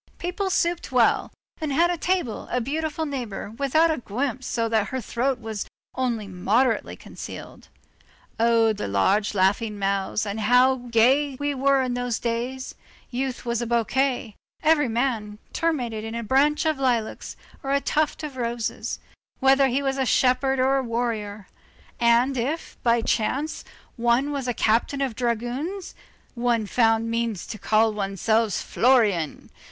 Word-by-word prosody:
People 360 +3 -2
supped 345 -4 0
well, 245 -3 +3 0.3
and 310 -2 -2
had 340 +5 +3
at 345 - -4
table 355 -11 -1
a 250 - 0
beautiful 310 +5 -2
neighbor 245 -8 -5
without 280 +7 +2
a 310 - -1
guimpe 255 +3 -3
so 230 -2 -1
that 220 -3 +1
her 260 - -3
throat 250 +2 -1
was 220 -3 -5 0.3
only 240 -5 -1
moderately 210 +7 +1
concealed. - - -10 0.7
Oh! 230 -1 +4
the 210 - -4
large 195 - +1
laughing 205 +3 +1
mouths, 195 +1 -1
and 205 +1 -4
how 250 +4 +4
gay 260 +5 +3
we 290 +2 -2
were 275 0 +2
in 250 -1 -2
those 245 -2 -1
days! 245 +3 -3 0.4
youth 255 0 -3
was 235 0 -1
a 240 - -2
bouquet; 240 0 0 0.3
every 310 -2 +4
young 230 - -3
man 225 -4 -1
terminated 245 -10 -1
in 225 +1 -5
a 235 - -3
branch 285 +7 +2
of 310 -3 +1
lilacs 240 -5 -1 0.3
or 270 - -5
a 280 - +3
tuft 305 +2 0
of 290 -4 -6
roses; 235 -2 -3 0.4
whether 270 0 +5
he 265 +2 0
was 270 0 -1
a 265 - +2
shepherd 260 +2 +2
or 265 +1 +3
a 270 - 0
warrior; 225 -4 -3 0.5
and 240 +3 +3
if, 285 +8 -3
by 235 -1 +3
chance, 270 +8 -1 0.3
one 240 +4 +2
was 275 -3 -3
a 245 - 0
captain 230 +5 +1
of 265 -5 -1
dragoons, 250 - -3 0.4
one 235 -2 0
found 225 +1 +2
means 230 -4 -2
to 215 - -7
call 220 +2 +3
oneself 210 +2 0
Florian. 215 - +1
245 Hz, 155 wpm, -24 LUFS, 225-275 Hz, 0.7 s, whether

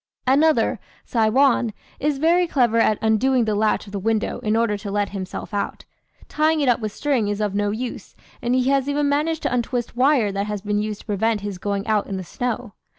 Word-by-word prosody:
"Another, 295 +4 +3 0.3
'Saiwan,' 235 0 +2 0.3
is 295 0 0
very 340 +4 +3
clever 240 -7 +2
at 215 -2 +3
undoing 235 +3 +3
the 215 - 0
latch 215 +1 +1
of 200 - -12
the 200 - -3
window 220 +2 -1
in 215 0 0
order 225 -2 +2
to 205 0 -6
let 205 0 0
himself 190 +1 -6
out; 205 - -3 0.4
tying 310 +1 +1
it 285 - +1
up 245 - +3
with 215 -2 -3
string 260 -3 0
is 205 0 -2
of 210 -2 -1
no 205 0 0
use, 235 +4 -5 0.3
and 240 +1 +1
he 255 +1 +2
has 275 0 +1
even 290 0 +1
managed 300 +3 0
to - - 0
untwist 240 -1 -2
wire 255 -4 +3
that 200 +1 -2
has 210 -2 -4
been 210 0 0
used 210 -1 -4
to - - -20
prevent 215 0 0
his 200 -3 -5
going 200 +1 -2
out 215 -2 +1
in 195 - -4
the 185 - -5
snow. 245 +3 -4
225 Hz, 215 wpm, -22 LUFS, 205-265 Hz, 0.4 s, Another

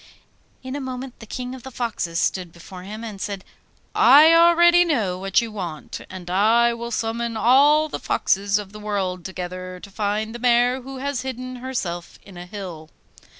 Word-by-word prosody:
In 260 +1 -5
a 285 - -4
moment 260 -1 -6
the 220 - -11
King 250 +3 -5
of 260 - -9
the 265 - -9
Foxes 230 -9 -3
stood 180 0 -1
before 180 +2 -11
him 210 +4 -8
and 210 -4 -7
said: 200 -2 -4 0.5
'I 300 +3 +7
know 330 - +7
already 345 +1 +6
what 195 - +1
you 230 -1 -5
want, 175 -7 -6
and 185 -2 -9
will 235 +5 +2
summon 230 0 -2
all 285 +7 +5
the - - -5
foxes 200 +1 +1
of 205 -2 -6
the 210 - -10
world 195 -4 -2
together 185 0 -6
to 200 - -12
find 215 +2 -2
the 240 - -7
mare 245 +1 +3
who 270 +1 -8
has 280 -1 -2
hidden 255 0 -6
herself 200 -10 -5
in 195 - -14
a 175 0 -9
hill. 180 -6 -8
220 Hz, 180 wpm, -22 LUFS, 190-255 Hz, 0.5 s, I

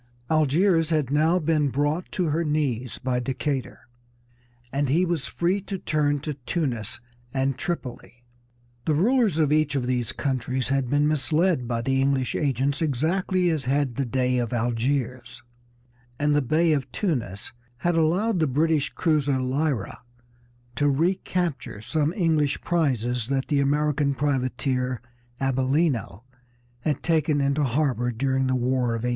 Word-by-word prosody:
Algiers 160 +2 +3
had 150 -5 0
now 155 +4 +3
been 155 -3 +1
brought 145 +6 -1
to 180 - -1
her 160 +3 0
knees 140 -6 -1
by 125 -1 -1
Decatur, 135 +1 -3 0.9
and 140 -1 0
he 170 +7 +3
was 170 -5 -1
free 180 +4 0
to 195 0 -5
turn 145 -4 0
to 150 +1 -3
Tunis 130 - -2 0.3
and 135 0 +1
Tripoli. 125 -7 -5 0.6
The 155 - +2
rulers 220 - +3
of 150 -2 +3
each 155 -2 +2
of 130 -3 0
these 125 -1 0
countries 130 -2 -2
had 135 -2 0
been 145 +2 +3
misled 155 0 +1
by 115 -1 -2
the 135 +1 +1
English 135 -2 +1
agents 140 +1 0
exactly 175 +5 +1
as 150 -5 -2
had 135 0 +1
the 135 - -1
Dey 125 +1 +1
of 120 0 -2
Algiers, 120 +1 -2 0.7
and 145 0 +2
the 145 - +3
Bey 155 +5 +2
of 140 -3 -2
Tunis 120 - -3 0.2
had 175 +7 0
allowed 175 +6 +2
the 160 - +2
British 150 +2 +1
cruiser 145 -5 +1
Lyra 130 -3 -1 0.8
to 145 0 +3
recapture 170 - -1
some 150 +7 0
English 160 -6 +1
prizes 125 -8 0
that 135 0 -1
the 145 -2 +2
American 145 0 +1
privateer 130 -2 -1 0.4
Abellino 135 - 0 0.6
had 145 +2 -2
taken 155 -3 +2
into 140 +1 +1
harbor 130 -2 0
during 130 +2 0
the 130 - +1
War 125 -1 +1
of 115 - -5
1812. - - +1
140 Hz, 145 wpm, -25 LUFS, 130-155 Hz, 0.9 s, Algiers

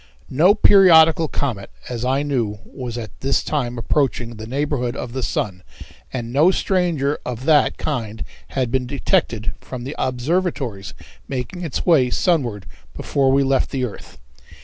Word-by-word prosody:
No 175 +10 +5
periodical 165 -6 +6
comet, 120 -10 -3 0.2
as 120 -1 -4
I 135 +3 +1
knew, 120 -8 -1
was 125 -3 -7
at 110 -3 -6
this 135 0 +1
time 125 -5 -2
approaching 120 -2 -1
the 110 +1 -8
neighborhood 135 -2 -2
of 120 - -6
the 130 - -3
sun, 95 -6 -2 0.5
and 120 -2 -5
no 150 +6 +5
stranger 175 -7 0
of 125 +1 -5
that 150 -2 +3
kind 115 -8 -3 0.3
had 125 -3 0
been 130 -1 0
detected 120 - 0
from 125 -2 -7
the 135 +4 -5
observatories 130 - -2 0.3
making 135 +7 -5
its 160 -6 -3
way 145 -8 +4
sunward 120 - 0 0.3
before 135 -1 +1
we 140 +1 +3
left 135 -1 +1
the 130 -2 -1
earth. 110 - -10
130 Hz, 150 wpm, -21 LUFS, 120-150 Hz, 0.5 s, periodical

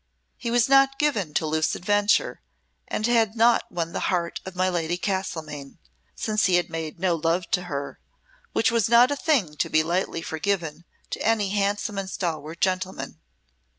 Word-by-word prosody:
He 235 - -5
was 235 -1 +3
not 270 0 +5
given 225 - 0
to - - +1
loose 155 0 0
adventure, 205 +3 +1 0.5
and 215 - -2
had 225 -2 +2
not 235 +1 +3
won 170 -1 -3
the - - -2
heart 170 -2 -1
of 190 - -7
my 185 +1 +1
Lady 175 -1 -1
Castlemaine, 160 -7 -4 0.4
since 215 -1 0
he 185 - +3
had 175 -1 +1
made 165 0 -5
no 185 -1 +2
love 165 +2 -1
to 180 -1 +1
her, 140 -4 -5 0.5
which 225 - +2
was 230 -3 +2
not 240 +3 +6
a - - +1
thing 260 - +1
to - - 0
be 155 - +3
lightly 170 0 -1
forgiven 165 -1 -2 0.3
to - - -4
any 215 -3 +1
handsome 205 +1 -1
and 190 -1 -4
stalwart 165 -3 -4
gentleman. 185 0 -2
185 Hz, 175 wpm, -25 LUFS, 165-215 Hz, 0.5 s, not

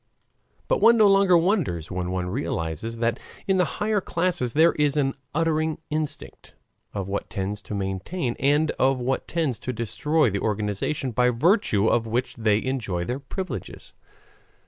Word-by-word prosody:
But - - +1
one 235 0 +7
no 215 - +6
longer 195 -2 +5
wonders 165 - 0
when 90 -1 -2
one 90 -1 -2
realizes 95 - -3
that 115 0 0 0.3
in 195 -1 +3
the 180 -3 0
higher 210 -1 +1
classes 170 -10 -1
there 160 +3 +5
is 150 -1 0
an 135 -2 +1 0.2
unerring 160 -1 +1
instinct 155 -1 -5 0.4
of 100 -2 -4
what 100 +1 -3
tends 100 +2 -3
to 105 - -6
maintain 100 - -3
and 145 +3 +3
of 130 0 +3
what 130 +2 -2
tends 155 -8 -1
to 130 - -4
destroy 120 +5 +1
the 100 - -1
organization 105 +6 -1
by 125 +2 +3
virtue 125 - +2
of 115 0 +2
which 125 +2 -2
they 110 -2 +1
enjoy 110 -10 -2
their 125 +6 -3
privileges. 185 +7 -7
125 Hz, 160 wpm, -25 LUFS, 105-160 Hz, 0.4 s, one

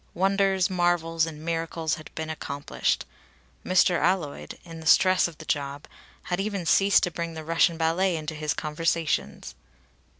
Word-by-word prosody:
Wonders, 195 0 +2
marvels, 175 -3 +1
and 155 -1 -8
miracles 165 -1 -2
had 155 -2 -6
been 160 0 -4
accomplished. 145 -2 -2 0.6
Mr. 180 -1 +3
Alloyd, 155 - -1
in 165 -2 -10
the 160 - -7
stress 185 +1 +5
of 165 -3 -11
the 155 - -11
job, 140 -1 -3 0.4
had 180 0 -2
even 200 -3 -2
ceased 195 +4 +4
to 180 - 0
bring 170 0 -5
the 160 - -6
Russian 165 +1 +2
ballet 170 +3 +1
into 155 0 -4
his 155 -1 -2
conversations. 165 +1 -2
165 Hz, 155 wpm, -26 LUFS, 155-180 Hz, 0.6 s, stress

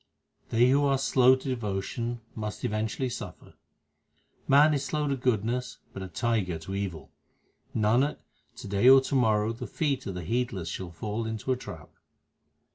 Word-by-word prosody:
They 120 +2 +4
who 140 +2 +4
are 135 -1 +3
slow 130 -1 +5
to 130 +1 -8
devotion 115 +1 -3
must 105 -1 -5
eventually 110 +4 -1
suffer: 120 - -8 0.9
Man 150 +3 +6
is 140 -2 0
slow 150 +1 -1
to 140 - +1
goodness, 125 0 -1 0.2
but 95 - -7
a 95 - -5
tiger 100 -2 -1
to 80 +4 -8
evil. 95 -5 -4 0.6
Nanak, 120 +7 +2 0.4
to - - -9
day 100 +5 +4
or 135 0 +9
to 135 - -5
morrow 110 -3 +2
the 120 +2 -7
feet 140 -4 -1
of 95 - -4
the 90 - -5
heedless 115 -4 -2
shall 90 +1 -5
fall 105 +7 -4
into 110 +3 -3
a - - +3
trap. 90 -11 -10
115 Hz, 165 wpm, -28 LUFS, 100-130 Hz, 0.9 s, or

